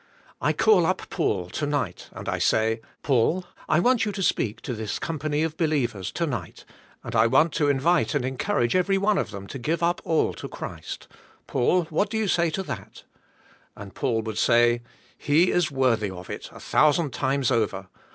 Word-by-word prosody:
I - - +2
call 195 -7 +4
up 185 - -1
Paul, 95 - -1
to 150 - -2
night, 135 -11 -3
and - - -9
I - - -1
say, 110 +1 +2 0.2
*'Paul, 145 +8 +2 0.2
I 155 - +4
want 245 +6 +3
you 210 - -1
to 195 - -3
speak 110 - 0
so 125 - -3
this 110 -2 -3
company 155 -1 -2
of 160 -1 -3
believers, 120 - 0
to 170 - 0
nig 115 - -4
ht, - - -15 0.4
and - - -6
I 110 +1 +5
want 155 +7 +3
to 145 - +1
envite 150 +4 +2
and 135 -4 0
encourage 125 -2 0
every 190 +2 +2
one 200 0 +2
of - - -2
them 100 -1 -8
to 135 - -7
give 160 +7 -1
up 175 +1 +1
all 160 -1 +1
to - - -7
Christ, - - -7 0.4
Paul, 155 +8 +2
what 195 +6 +1
do 220 - -2
you 220 -1 0
say 170 -2 +2
to 190 +4 -3
that?" - - -8 0.7
And 100 -1 -10
Paul 115 -3 -1
would 110 -1 -4
say, 120 0 +4 0.4
*'He 160 +5 +3
is 175 -2 +2
worthy 125 -7 +1
of 90 -1 -8
it, - - -7
a - - -12
thousand 150 -2 +2
times 135 0 0
over. 105 -5 0
145 Hz, 200 wpm, -25 LUFS, 115-170 Hz, 0.7 s, I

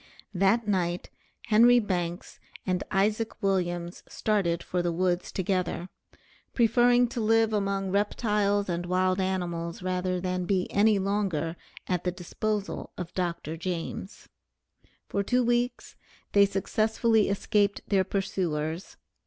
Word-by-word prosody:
That 200 +4 +2
night 180 -3 -1 0.3
Henry 235 +3 +6
Banks 180 -5 -2 0.3
and 185 -1 0
Isaac 210 +3 0
Williams 175 -2 -1
started 185 -6 0
for 180 - -1
the 175 0 0
woods 180 +1 0
together, 185 -1 -1 0.7
preferring 245 +1 +4
to 235 - -3
live 225 0 +3
among 195 -2 0
reptiles 205 0 +1
and 175 0 -2
wild 185 +1 +1
animals, 175 -2 -2
rather 185 0 -1
than 180 0 -2
be 185 -1 +1
any 210 +1 +4
longer 190 -5 -1 0.3
at 180 -2 -1
the 180 - 0
disposal 200 +3 -3
of 180 -1 -6
Dr. 170 -3 -2
James. 175 +2 -5 0.8
For 200 - -1
two 250 +5 +2
weeks 240 +1 -1 0.4
they 200 -1 +6
successfully 220 +2 +1
escaped 200 0 +1
their 195 -2 +3
pursuers. 180 -4 -2
195 Hz, 120 wpm, -28 LUFS, 180-210 Hz, 0.8 s, Henry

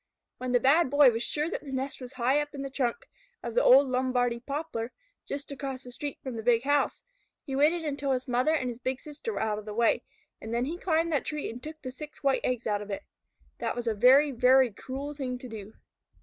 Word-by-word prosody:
When 255 0 -3
the 245 - +4
Bad 280 +4 +4
Boy 285 -2 +7
was 230 0 -3
sure 300 +5 -1
that - - -3
the 280 - -8
nest 265 +1 -3
was 250 +1 -8
high 255 +3 +2
up 295 0 -6
in 275 - -4
the 275 - -5
trunk 270 - -2 0.4
of 235 - -4
the 240 - +3
old 270 +2 +7
Lombardy 250 -2 +1
poplar, 275 -3 -4 0.4
just 285 +1 -5
across 270 -2 -5
the 250 - -10
street 285 +3 -5
from 260 -3 -5
the 225 - -4
big 235 +1 +3
house, 285 +1 +1 0.4
he 270 - -4
waited 315 +4 +3
until 280 -2 -1
his 255 -1 -1
mother 255 +6 +2
and 260 -5 -1
his 240 -1 -5
big 260 0 -2
sister 300 +11 -6
were - - -3
out 215 -1 0
of 210 - -11
the 210 -1 -6
way, 235 0 +3 0.4
and 225 +1 -4
then 240 +1 +1
he 335 +5 -4
climbed 330 -2 +1
that 290 - 0
tree 300 -1 -3
and 240 +2 -9
took 310 +2 -8
the 255 - -5
six 300 +3 -10
white 275 -1 +2
eggs 250 -2 -1
out 205 -2 0
of 210 - -8
it. 200 - -4 0.6
That - - -2
was 240 0 -4
a 225 - +1
very, 260 +7 +6
very 255 0 +5
cruel 270 +7 -6
thing 260 -3 -4
to 255 - -9
do. 215 -2 -9
260 Hz, 245 wpm, -28 LUFS, 240-290 Hz, 0.6 s, Boy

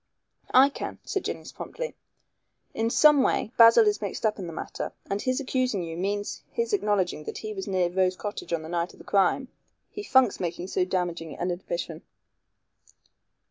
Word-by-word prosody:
"I 265 +2 +8
can," - - -6
said 390 - -2
Jennings - - -5
promptly, - - -6 0.8
"in 225 +1 0
some 300 +3 +6
way 240 - +1
Basil 230 - +8
is 420 -1 +1
mixed - - -3
up 215 -1 +1
in 185 - -5
the - - -6
matter, 165 - -5
and 200 +1 -2
his 255 +1 0
accusing 255 -7 0
you 165 -1 -5
means 205 +3 -2
his 465 -1 -2
acknowledging 200 - 0
that - - -5
he 215 -1 -5
was 195 -1 -6
near 185 -2 +1
Rose 185 +1 +1
Cottage 205 -1 -6
on 165 -2 -1
the - - -7
night 170 0 -2
of - - -17
the - - -14
crime. 200 +7 +2 0.4
He 410 - -6
funks 260 - +3
making 175 +1 -4
so 185 - +1
damaging 175 -3 -3
an 180 +1 -1
admission." 170 -2 -4
200 Hz, 180 wpm, -27 LUFS, 175-255 Hz, 0.8 s, I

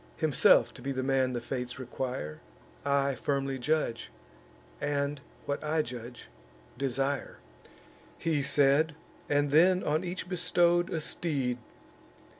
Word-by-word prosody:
Himself 155 -4 +4
to 125 - -12
be 135 +2 -3
the 130 -1 -2
man 130 -1 +2
the 120 - -1
fates 125 0 -4
require, 125 - -5 0.4
I 140 -1 +2
firmly 135 0 -1
judge, 125 - -1 0.7
and, 145 0 -1 0.2
what 140 +1 -2
I 155 +1 +1
judge, 120 -1 -8 0.5
desire." 135 +2 -2 0.8
He 160 -3 0
said, 145 +2 +3 0.3
and 145 -1 +2
then 180 +5 +5
on 155 +3 +1
each 180 0 -4
bestow'd 175 -1 +2
a 165 - -1
steed. 135 -7 -2
140 Hz, 120 wpm, -30 LUFS, 130-155 Hz, 0.8 s, then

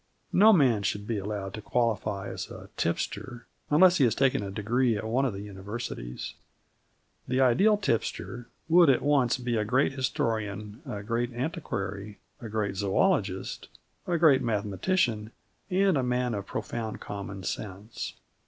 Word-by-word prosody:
No 215 +4 +7
man 130 - +4
should 100 +1 -2
be 110 -1 -1
allowed 100 -1 -4
to 110 - -6
qualify 105 -4 -1
as - - -5
a - - -10
tipster 120 -1 -3 0.2
unless 180 +4 +6
he - - +5
has 115 -2 +2
taken 135 -4 +2
a 100 - -4
degree 115 +4 +1
at 100 - -4
one 120 +5 +1
of 125 - -1
the 100 +1 -6
Universities. 100 - -6 0.9
The 130 +1 0
ideal 140 - +5
tipster 120 - -2 0.2
would 170 -1 +6
at 130 - +3
once 140 -4 +3
be 120 -2 -1
a 105 - +1
great 130 +7 +2
historian 110 -4 -2
a 105 -5 -5
great 120 +3 -1
antiquary, 105 -6 -4 0.2
a 115 - -6
great 105 -2 -2
zoologist, 100 - 0 0.4
a 175 - +1
great 150 -5 +5
mathematician, 110 - 0 0.4
and 190 -1 +3
a - - +2
man 125 -1 0
of 100 -2 -4
profound 110 -2 -4
common 100 -1 -6
sense. 100 +4 -5
115 Hz, 155 wpm, -28 LUFS, 105-130 Hz, 0.9 s, No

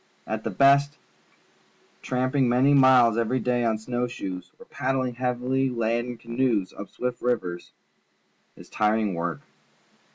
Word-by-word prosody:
At - - -4
the - - -2
bast, 140 +1 +3 1.0
tramping 130 0 0
many 130 +4 +3
miles 130 -4 +5
e\ery 115 +3 0
day 125 -1 0
on 110 -2 +1
snow 120 +2 -3
shoes 95 -7 -7
or 235 - -15
paddling 130 - -2
hea\ily 125 +2 -1
laden 120 0 -2
ca 115 - -22
noes 115 -6 0
up 100 - -9
swift 125 0 -4
rivers 95 -8 -2 0.8
is - - -14
hard, - - -10 0.2
tiring 110 -3 -1
work. 85 -4 -3
125 Hz, 140 wpm, -25 LUFS, 115-130 Hz, 1.0 s, miles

